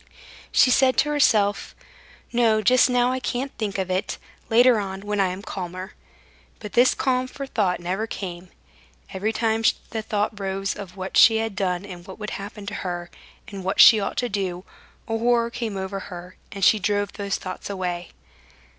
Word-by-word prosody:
She 255 - +5
said 260 0 +4
to 295 - +3
herself: 215 -9 +2 0.6
"No, 225 -2 +3
just 250 +4 +5
now 245 0 +2
I 260 - -1
can't 260 +2 -3
think 205 -3 -2
of 190 -1 -2
it, 185 +1 -2 0.3
later 240 0 +5
on, 190 -1 -5
when 205 0 -3
I 195 - +3
am 185 +2 -5
calmer." 185 -1 -6 0.6
But 210 -2 -9
this 245 +2 +5
calm 255 -1 0
for 275 +2 -7
thought 205 -9 0
never 185 +5 -2
came; 180 -4 -7 0.6
every 200 +3 -1
time 225 0 0 0.3
the 220 - -2
thought 210 -1 -2
rose 195 0 -2
of 195 -2 -9
what 190 0 -3
she 225 -1 +7
had 225 -2 -2
done 185 -1 -1
and 180 -3 -10
what 190 - -9
would 210 -1 -6
happen 205 +1 -7
to 200 - -5
her, 175 -1 -5 0.4
and 195 -2 -7
what 190 +1 -2
she 220 - +9
ought 195 - -3
to 245 - 0
do, 190 -4 -3 0.4
a 225 - -1
horror 235 0 +2
came 230 -4 -4
over 190 +1 -4
her 180 -1 -9 0.2
and 195 -2 0
she 215 - +5
drove 205 +1 -1
those 200 -1 -2
thoughts 185 - -7
away. 180 -3 -3
205 Hz, 185 wpm, -24 LUFS, 190-225 Hz, 0.6 s, she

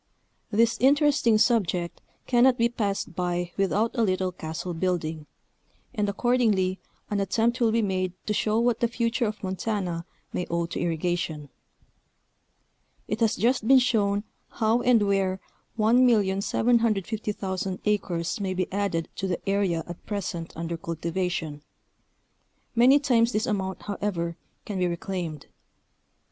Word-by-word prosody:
This 230 +2 +2
interesting 280 -4 +4
subject 185 -7 +1 0.2
cannot 250 +1 +4
be 235 0 +3
passed 200 -6 -2
by 175 0 -2
without 205 +3 +1
a 235 - +1
little 185 -3 +1
castle 160 +1 -5
building, 160 -3 -2 0.7
and 210 -4 0
accordingly 205 -4 +1 0.3
an 205 - +1
attempt 225 +5 +1
will 230 -2 +4
be 230 0 +2
made 185 -2 -1
to 210 - 0
show 215 +1 +1
what 235 -1 +2
the 235 - +2
future 230 0 0
of 210 0 -6
Montana 185 -3 -2 0.3
may 180 - -2
owe 170 0 0
to 170 - -5
irrigation. 165 -3 -2 1.6
It 210 - -2
has 225 -2 +2
just 235 +2 +1
been 270 +1 +8
shown 205 -5 +2 0.3
how 225 +2 +1
and 240 -3 +4
where 195 -2 +1 0.4
1,750,000 215 -3 +1
acres 190 -2 -1
may 190 -2 -2
be 185 0 -2
added 195 -5 -1
to 195 - -2
the 180 +1 -4
area 195 -5 +1
at 175 -1 -10
present 175 -5 -4
under 165 +1 -4
cultivation; 165 -2 -3 1.1
many 250 +4 +6
times 245 -5 +2
this 215 - +1
amount, 190 -3 -2
however, 185 -5 -2 0.3
can 200 -3 -4
be 180 - +2
reclaimed. 170 -3 -4
200 Hz, 130 wpm, -26 LUFS, 175-230 Hz, 1.6 s, been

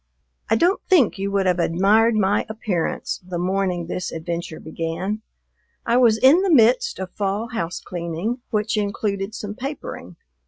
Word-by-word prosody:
I 225 - +4
don't 355 - +2
think 275 - +4
you 195 +1 -1
would 200 -1 +1
have 180 -1 +2
admired 205 +7 +3
my 200 -1 +2
appearance 210 -6 -2
the 180 -1 -5
morning 180 -1 -1
this 180 +2 -4
adventure 170 0 -5
began: 165 +6 -4 0.6
I 235 +1 +3
was 235 -3 +5
in 270 +10 +6
the 390 - +1
midst 265 - +4
of 185 -1 -5
fall 205 +3 -2
house 175 -7 -3
cleaning 175 +8 -4
which 215 0 0
included 200 0 -2
some 205 -1 -5
papering. 250 - -7
200 Hz, 155 wpm, -22 LUFS, 180-225 Hz, 0.6 s, in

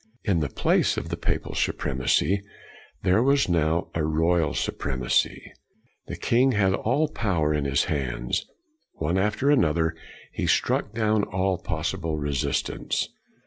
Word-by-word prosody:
In 95 -6 +1
the 75 -3 -1
place - - +1
of - - -4
the - - -2
Papal - - -2
Supremacy 65 +9 +1 0.6
there 95 +5 +3
was 140 +2 +3
now 85 -1 +1
a 80 - -1
Royal 80 +1 +1
Su - - 0
premacy. 65 -3 -1 0.6
The - - -5
king 130 +3 +3
had 95 -3 +2
all 130 +10 +1
power 85 - 0
in 75 -2 -1
his 70 -1 +2
hands. 60 -4 -2 0.5
One 85 +4 -1
after 105 +8 +1
another, 80 - +2 0.4
he - - -2
struck 105 - +1
down 110 -2 +2
all 95 -1 -1
possible 80 -1 -3
resistance. 70 -2 -1
85 Hz, 140 wpm, -25 LUFS, 75-105 Hz, 0.6 s, there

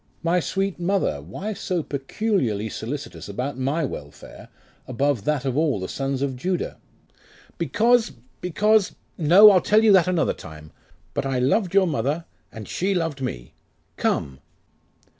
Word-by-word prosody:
'My 170 +2 +2
sweet 195 +2 -2
mother, 175 - 0
why 185 - -5
so 180 -4 -2
peculiarly 135 - -1
solicitous 135 +2 -6
about 125 +6 -4
my 145 +5 0
welfare, 75 - -9 0.4
above 130 -3 0
that 150 -3 0
of 130 -2 -1
all 150 -7 +1
the 95 - -4
sons 135 0 -2
of 135 -2 -2
Judah?' 180 +8 -3 0.8
'Because 235 +1 +2 0.3
because 210 +4 +2 0.2
No, 185 +6 +8
I'll 185 -2 +4
tell 215 +1 +3
you 220 - +6
that 185 -3 +5
another 175 -4 +1
time. 75 -1 -12 0.4
But 135 - -2
I 135 -1 -1
loved 175 - +1
your 195 -1 +6
mother, 155 0 -1 0.3
and 110 -3 -9
she 195 +2 -1
loved 165 -6 -2
me. 60 - -5 0.4
Come! 65 -1 -1
150 Hz, 145 wpm, -23 LUFS, 130-190 Hz, 0.8 s, No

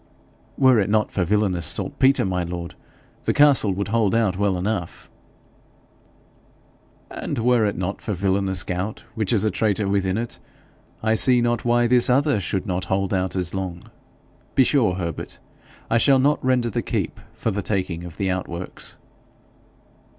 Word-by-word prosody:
'Were 130 -4 +5
it 100 - 0
not 105 0 +1
for 95 - 0
villanous 95 -3 +1
saltpetre, 135 -3 +2
my 90 -2 -1
lord, 85 0 -6 0.5
the - - +1
castle 140 -8 +5
would 100 +2 -3
hold 110 -2 +1
out 110 -5 +2
well 100 -1 0
enough.' 90 -2 -4 2.0
'And - - -4
were 120 -1 +3
it 100 - -3
not 95 +2 -3
for 105 - -3
villanous 95 0 0
gout, 90 +4 -4
which 110 -4 -2
is 110 -4 +2
a 110 - +1
traitor 105 0 0
within 100 -1 0
it, 120 +1 -4 0.6
I 110 0 +2
see 125 +2 +4
not 120 0 0
why 120 0 +3
this 125 +1 +3
other 140 -2 +3
should 95 0 -2
not 90 -2 -2
hold 95 +1 -1
out 95 0 -1
as 90 -2 -1
long. 95 -2 -5 0.6
Be 135 - +6
sure, 120 -9 +2
Herbert, 85 -3 -5 0.5
I 115 - +2
shall 135 +2 +5
not 140 +3 +2
render 125 -2 +1
the - - -1
keep - - -3 0.2
for 115 - -2
the 100 +1 -2
taking 95 -4 -2
of 90 -1 -10
the 95 -2 0
outworks.' 90 -1 -5
100 Hz, 165 wpm, -22 LUFS, 95-115 Hz, 2.0 s, Be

